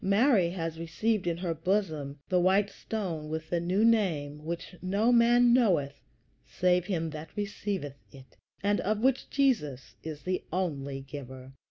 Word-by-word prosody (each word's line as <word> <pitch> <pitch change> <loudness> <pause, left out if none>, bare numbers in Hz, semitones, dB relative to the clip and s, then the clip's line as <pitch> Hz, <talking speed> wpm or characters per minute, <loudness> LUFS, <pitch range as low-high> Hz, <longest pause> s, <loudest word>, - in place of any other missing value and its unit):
Mary 200 -2 +4
has 165 -2 -4
received 185 +4 -1
in 170 -1 0
her 175 -1 -2
bosom 160 -5 -1
the 180 - +2
"white 195 +3 +3
stone 170 -9 -4
with 160 0 -5
the 175 - +2
new 185 +6 +2
name, 155 -10 +1
which 170 +2 -5
no 200 +6 +2
man 240 0 +5
knoweth 175 - +2 0.4
save 180 -1 +1
him 165 -4 -1
that 155 0 -7
receiveth 200 -8 -4
it," 135 -1 -15 0.3
and 205 +1 +2
of 215 +1 0
which 265 0 +2
Jesus 150 - 0 0.6
only 145 -7 -2
is 135 - -8
the - - -18
giver. 130 -2 -9
180 Hz, 155 wpm, -29 LUFS, 150-205 Hz, 0.6 s, man